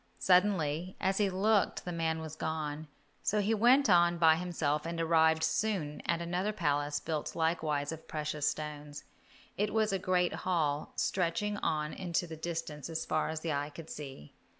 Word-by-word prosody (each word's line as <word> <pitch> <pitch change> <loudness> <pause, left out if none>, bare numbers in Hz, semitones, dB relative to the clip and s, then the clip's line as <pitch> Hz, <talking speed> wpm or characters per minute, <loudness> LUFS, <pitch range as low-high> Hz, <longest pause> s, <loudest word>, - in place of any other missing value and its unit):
Suddenly, 180 -3 +2
as 190 +1 +1
he 205 -2 +3
looked 200 +2 +1
the 180 - -3
man 160 -1 -1
was 160 -1 -7
gone, 155 -1 -3 0.3
so 210 - +1
he 205 +2 +1
went 245 +6 +5
on 175 -2 +5
by 160 -1 +6
himself, 160 -4 -1
and 170 0 -4
arrived 160 -1 +3
soon 160 -2 -1
at 170 0 +1
another 180 +4 -1
palace 145 -6 0
built 155 -1 -3
likewise 160 -3 0
of 160 0 -8
precious 150 -1 -1
stones. 150 -1 -6 0.5
It 210 +1 0
was 220 -2 +1
a 195 - +1
great 180 -1 +1
hall, 155 -5 -1
stretching 190 +3 0
on 150 -5 -1
into 175 -2 -1
the 165 -2 -7
distance 165 -2 -5
as 165 0 -3
far 155 - 0
as 160 0 -4
the 160 -2 -1
eye 145 +1 -2
could 160 +2 -10
see. 135 - -8
165 Hz, 175 wpm, -32 LUFS, 150-185 Hz, 0.5 s, by